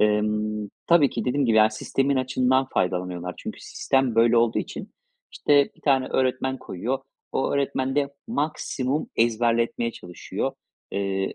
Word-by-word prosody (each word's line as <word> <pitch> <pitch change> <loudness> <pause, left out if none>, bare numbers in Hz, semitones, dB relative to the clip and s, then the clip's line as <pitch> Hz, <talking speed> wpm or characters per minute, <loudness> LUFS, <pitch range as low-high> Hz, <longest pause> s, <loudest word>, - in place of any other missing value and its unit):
Emm, 105 0 +1 0.2
tabii 165 -5 +5
ki - - -3
dediğim 135 +1 +1
gibi 110 -1 +3
yani 110 0 +6
sistemin 135 +5 0
açığından 130 0 +2
faydalanıyorlar. 90 -1 -1
Çünkü - - -7
sistem, 135 -3 0
böyle, 115 +1 +4
olduğu 115 -1 +3
için, - - -6 0.4
işte, 145 -1 +3
1 - - -23
tane 135 -3 +2
öğretmen 130 0 0
koyuyor. 120 +9 -3 0.3
O 135 - 0
öğretmen 135 -1 0
de, 140 -1 0
maksimum 150 - -2
ezberletmeye 115 0 +1
çalışıyor, 90 -4 -5 0.4
eee, 95 -1 -2
120 Hz, 140 wpm, -25 LUFS, 105-135 Hz, 0.4 s, yani